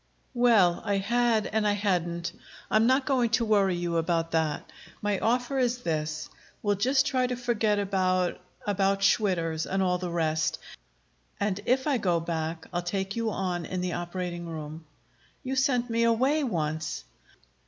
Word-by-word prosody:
"Well, 225 Hz, -8 st, +4 dB
I 205 Hz, -2 st, 0 dB
had 230 Hz, +2 st, +2 dB
and 215 Hz, 0 st, 0 dB
I 205 Hz, -, +3 dB
hadn't. 175 Hz, -4 st, -1 dB, 0.4 s
I'm 220 Hz, +1 st, +4 dB
not 260 Hz, +1 st, +3 dB
going 255 Hz, -4 st, +2 dB
to 235 Hz, -, -1 dB
worry 200 Hz, -4 st, +3 dB
you 175 Hz, -1 st, -1 dB
about 165 Hz, 0 st, 0 dB
that. 160 Hz, -2 st, -1 dB, 0.3 s
My 205 Hz, -2 st, 0 dB
offer 245 Hz, +3 st, +1 dB
is 245 Hz, -1 st, 0 dB
this: 155 Hz, -1 st, -2 dB, 0.4 s
We'll 205 Hz, -1 st, +2 dB
just 260 Hz, +7 st, +2 dB
try 255 Hz, -2 st, +1 dB
to 250 Hz, -, -2 dB
forget 230 Hz, -4 st, +1 dB
about 185 Hz, -3 st, 0 dB, 0.2 s
about 195 Hz, -1 st, +1 dB
Schwitter's 170 Hz, -6 st, +1 dB
and 190 Hz, 0 st, 0 dB
all 180 Hz, -1 st, +1 dB
the 180 Hz, -1 st, -3 dB
rest, 160 Hz, -2 st, 0 dB, 0.8 s
and 200 Hz, -1 st, 0 dB
if 260 Hz, +2 st, +2 dB
I 280 Hz, -5 st, +1 dB
go 175 Hz, -5 st, +1 dB
back 165 Hz, 0 st, -3 dB
I'll 175 Hz, -, 0 dB
take 190 Hz, +2 st, -3 dB
you 230 Hz, -1 st, 0 dB
on 180 Hz, -4 st, -2 dB
in 185 Hz, +2 st, -3 dB
the 180 Hz, -1 st, -2 dB
operating 175 Hz, 0 st, -4 dB
room." 155 Hz, 0 st, -7 dB, 0.6 s
"You 265 Hz, 0 st, -2 dB
sent 255 Hz, -2 st, +2 dB
me 230 Hz, -1 st, 0 dB
away 260 Hz, +7 st, +3 dB
once!" 155 Hz, -, -2 dB
195 Hz, 165 wpm, -28 LUFS, 170-235 Hz, 0.8 s, Well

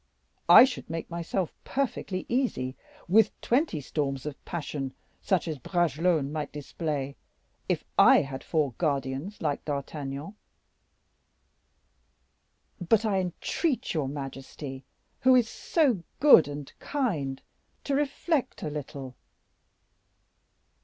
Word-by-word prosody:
I -, -, +11 dB
should 255 Hz, -, -6 dB
make 165 Hz, +1 st, -5 dB
myself 170 Hz, +1 st, -2 dB
perfectly 230 Hz, -8 st, -2 dB
easy 230 Hz, -, -1 dB, 0.3 s
with 210 Hz, +4 st, +4 dB
twenty 250 Hz, -, +1 dB
storms 135 Hz, -1 st, -2 dB
of 150 Hz, -2 st, -6 dB
passion, 145 Hz, -5 st, -4 dB, 0.3 s
such 185 Hz, -3 st, +1 dB
as 155 Hz, -4 st, -3 dB
Bragelonne 165 Hz, -2 st, +1 dB
might 150 Hz, -2 st, -3 dB
display, 145 Hz, -1 st, -4 dB, 0.5 s
if -, -, 0 dB, 0.2 s
I -, -, +8 dB
had 135 Hz, -1 st, -6 dB
four 150 Hz, -5 st, 0 dB
guardians 140 Hz, +5 st, -2 dB
like 145 Hz, -3 st, -1 dB
D'Artagnan." 140 Hz, +3 st, -4 dB, 2.5 s
"But 205 Hz, +5 st, +2 dB
I 200 Hz, -3 st, +2 dB
entreat 235 Hz, -, -1 dB
your 155 Hz, -5 st, 0 dB
majesty, 135 Hz, -1 st, -7 dB, 0.3 s
who 260 Hz, 0 st, +6 dB
is 245 Hz, -3 st, +4 dB
so 260 Hz, -, +1 dB, 0.2 s
good 275 Hz, -, +8 dB
and 145 Hz, -1 st, -7 dB
kind, 165 Hz, -, -1 dB, 0.4 s
to 280 Hz, -, -2 dB
reflect 290 Hz, +1 st, 0 dB
a 150 Hz, -, -2 dB
little." 140 Hz, -3 st, -6 dB
155 Hz, 110 wpm, -28 LUFS, 140-210 Hz, 2.5 s, I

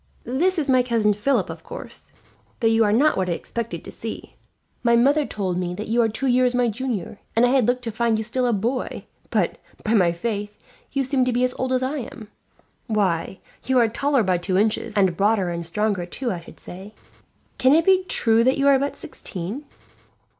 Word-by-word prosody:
"This 350 Hz, +9 st, +1 dB
is 305 Hz, -3 st, 0 dB
my 255 Hz, -2 st, +4 dB
Cousin 230 Hz, -4 st, +2 dB
Philip, 235 Hz, +7 st, +1 dB
of -, -, -10 dB
course; -, -, -8 dB, 0.5 s
though 230 Hz, -, +2 dB
you 225 Hz, 0 st, +4 dB
are 205 Hz, -, +2 dB
not 280 Hz, +8 st, +3 dB
what 185 Hz, -1 st, 0 dB
I -, -, +1 dB
expected 210 Hz, -2 st, -5 dB
to -, -, -8 dB
see. 225 Hz, -, -7 dB, 0.5 s
My 235 Hz, -1 st, +4 dB
mother 280 Hz, +5 st, +3 dB
told 185 Hz, -4 st, -2 dB
me 180 Hz, -1 st, -3 dB
that 215 Hz, +3 st, -6 dB
you 235 Hz, +2 st, +1 dB
were 230 Hz, -1 st, +4 dB
two 250 Hz, +6 st, -3 dB
years' 250 Hz, -1 st, +3 dB
my 245 Hz, -1 st, +2 dB
junior, 220 Hz, -4 st, -4 dB, 0.2 s
and 230 Hz, +2 st, +5 dB
I -, -, +3 dB
had 255 Hz, -3 st, +3 dB
looked 250 Hz, 0 st, 0 dB
to 230 Hz, -, -3 dB
find 230 Hz, 0 st, +1 dB
you 220 Hz, -, -2 dB
still 245 Hz, +3 st, 0 dB
a -, -, +2 dB
boy; 235 Hz, +5 st, -2 dB, 0.2 s
but, -, -, 0 dB, 0.2 s
by 220 Hz, -, 0 dB
my 180 Hz, -6 st, +4 dB
faith, 205 Hz, +3 st, -4 dB, 0.3 s
you 275 Hz, 0 st, 0 dB
seem 260 Hz, 0 st, +1 dB
to 255 Hz, -, +1 dB
be 245 Hz, +1 st, +1 dB
as 250 Hz, 0 st, +1 dB
old 260 Hz, 0 st, -1 dB
as 255 Hz, 0 st, +1 dB
I 280 Hz, +3 st, -1 dB
am. 220 Hz, -3 st, -9 dB, 0.6 s
Why, 190 Hz, -5 st, 0 dB, 0.3 s
you 260 Hz, 0 st, +2 dB
are 235 Hz, -2 st, +5 dB
taller 275 Hz, +2 st, +1 dB
by 185 Hz, -3 st, +1 dB
two 185 Hz, +1 st, -1 dB
inches, 215 Hz, +1 st, 0 dB
and 190 Hz, -3 st, +3 dB
broader 200 Hz, -1 st, +2 dB
and 170 Hz, 0 st, -4 dB
stronger 190 Hz, +1 st, -1 dB
too, 240 Hz, +6 st, -3 dB
I 180 Hz, -, -3 dB
should 170 Hz, -, -15 dB
say. 195 Hz, +4 st, -9 dB, 0.6 s
Can 260 Hz, +3 st, +5 dB
it 330 Hz, +1 st, +3 dB
be 375 Hz, -1 st, +4 dB
true 230 Hz, -9 st, +3 dB
that 260 Hz, +2 st, +3 dB
you 275 Hz, 0 st, +2 dB
are 275 Hz, -1 st, +5 dB
but 280 Hz, +1 st, -2 dB
sixteen?" 200 Hz, -, -6 dB
230 Hz, 220 wpm, -23 LUFS, 205-255 Hz, 0.6 s, and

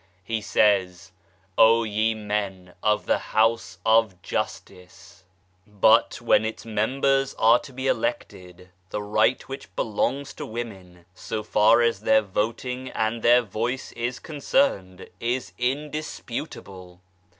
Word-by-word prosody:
He 110 Hz, +3 st, -3 dB
says: 95 Hz, -4 st, +1 dB, 0.2 s
" 95 Hz, +1 st, -38 dB
O 115 Hz, +1 st, +6 dB
ye 110 Hz, +1 st, 0 dB
men 100 Hz, -4 st, -4 dB
of 105 Hz, -1 st, +1 dB
the -, -, +1 dB, 0.2 s
House 110 Hz, -5 st, +2 dB
of 110 Hz, -4 st, +3 dB
Justice! 90 Hz, 0 st, -6 dB, 0.2 s
" 90 Hz, 0 st, -38 dB
But 105 Hz, -2 st, +3 dB
when -, -, +3 dB
its 110 Hz, +1 st, -5 dB
members 135 Hz, +5 st, 0 dB
are 115 Hz, +2 st, +5 dB
to 140 Hz, -, -12 dB
be 130 Hz, +1 st, -6 dB
elected 90 Hz, -, -3 dB, 0.2 s
the 105 Hz, -, -4 dB
right 110 Hz, +4 st, +1 dB
which 135 Hz, -9 st, -9 dB
belongs 135 Hz, +6 st, -1 dB
to -, -, -7 dB
women, 95 Hz, -7 st, -8 dB
so 105 Hz, +3 st, -5 dB
far 110 Hz, +3 st, +4 dB
as 115 Hz, -4 st, +1 dB
their 110 Hz, +1 st, +3 dB
voting 120 Hz, +6 st, -3 dB
and 110 Hz, 0 st, -2 dB
their 120 Hz, +2 st, +5 dB
voice 120 Hz, +5 st, -3 dB
is 120 Hz, +1 st, -3 dB
concerned, 145 Hz, -, -1 dB
is 120 Hz, -5 st, -2 dB
indisputable. 125 Hz, -, -5 dB
110 Hz, 130 wpm, -24 LUFS, 95-120 Hz, 0.2 s, O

